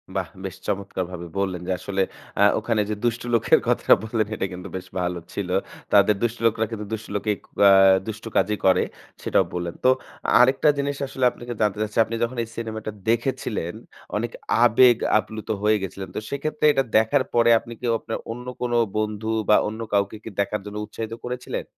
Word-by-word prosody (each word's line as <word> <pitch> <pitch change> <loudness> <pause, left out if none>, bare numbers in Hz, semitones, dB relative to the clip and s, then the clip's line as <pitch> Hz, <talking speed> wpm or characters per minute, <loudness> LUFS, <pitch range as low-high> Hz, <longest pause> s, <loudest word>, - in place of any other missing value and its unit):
বাহ! 95 -2 -1 0.2
বেশ 95 -1 -5
চমৎকারভাবে 95 -3 -3
বললেন 95 -3 -1
যে, - - -1
আসলে 100 -1 -2 0.4
আ - - +4 0.2
ওখানে 110 0 0
যে 105 - -1
দুষ্ট 120 0 0
লোকের 115 - +4
কথাটা - - +5
বললেন 110 -1 -1
এটা 95 - -2
কিন্তু 90 +2 -8
বেশ 95 - -6
ভালো 90 0 -2
ছিল। 100 -3 -3 0.4
তাদের 105 +1 +6
দুষ্ট 120 0 0
লোকরা 110 0 +2
কিন্তু 105 -2 -5
দুষ্ট 110 0 -5
লোকেক 105 0 -1 0.3
আ - - +9 0.4
দুষ্ট 110 0 -6
কাজই 105 +2 +2
করে 95 -1 +5 0.4
সেটাও - - +2
বললেন। 85 -1 -3
তো - - +7 0.5
আরেকটা 130 +4 +5
জিনিস 140 0 -1
আসলে 130 -1 -1
আপনাকে 120 0 -7
জানতে 105 -1 +1
চাচ্ছি, 105 0 -3
আপনি 115 +2 -4
যখন 120 +1 -2
এই - - -7
সিনেমাটা 110 -2 -5 0.2
দেখেছিলেন 115 -6 -1 0.4
অনেক 115 +2 -2 0.3
আবেগ 120 +1 +6 0.2
আপ্লুত 110 0 -7
হয়ে 105 0 +4
গেছিলেন। 95 0 -5
তো - - -1
সেই 140 - -3
ক্ষেত্রে 155 0 -1
এটা 135 - +2
দেখার 110 +5 +3
পরে 120 0 +4
আপনি 115 - -10
কি - - -6
আপনার 115 - -4
অন্য 125 +2 -7 0.2
কোনো 120 -1 0 0.2
বন্ধু 110 0 -2 0.2
বা 105 - +7
অন্য 110 +1 -5
কাউকে 100 +1 +1
কি - - -6
দেখার 100 +1 0
জন্য 105 0 -7
উৎসাহিত 110 +1 -6
করেছিলেন? 125 0 -4
110 Hz, 185 wpm, -24 LUFS, 100-120 Hz, 0.5 s, আ